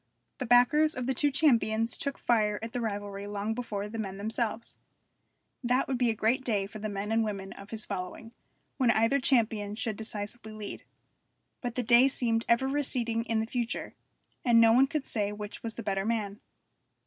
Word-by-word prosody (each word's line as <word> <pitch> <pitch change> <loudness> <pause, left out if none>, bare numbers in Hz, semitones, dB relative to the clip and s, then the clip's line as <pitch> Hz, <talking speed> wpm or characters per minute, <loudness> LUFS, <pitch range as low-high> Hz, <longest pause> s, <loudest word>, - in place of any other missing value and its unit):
The 255 - -3
backers 275 +6 +5
of 250 - -3
the 265 - +1
two 290 +3 +2
champions 230 -6 +2
took 280 -1 -2
fire 215 -3 +2
at 225 - -6
the 245 - -2
rivalry 205 -2 -4
long 205 +1 -2
before 210 -4 -4
the 225 +2 -6
men 195 -3 -4
themselves. 220 +2 -2 0.9
That 250 +2 +2
would 260 -2 -1
be 245 -2 +3
a 225 - 0
great 235 +5 +1
day 210 -6 0
for 215 +2 -9
the 215 +1 -3
men 205 +1 -4
and 225 0 +3
women 195 -3 -4
of 200 +1 -12
his 220 -1 0
following, 200 +4 -6 0.4
when 255 -4 +3
either 230 +5 +3
champion 220 -6 +1
should 220 -2 -2
decisively 220 +1 -5
lead. 215 -1 -7 0.8
But 240 -2 -4
the 250 - -1
day 240 +3 +6
seemed 230 -4 0
ever 235 +3 +3
receding 245 -5 0
in 225 -2 0
the - - -1
future, 240 0 -3 0.5
and 235 -2 +5
no 225 0 +7
one 260 +3 +5
could 300 -1 -3
say 205 -3 -1
which 210 0 -7
was 225 -1 -5
the 230 - -6
better 195 -1 -1
man. 210 -2 -2
225 Hz, 195 wpm, -29 LUFS, 210-245 Hz, 0.9 s, no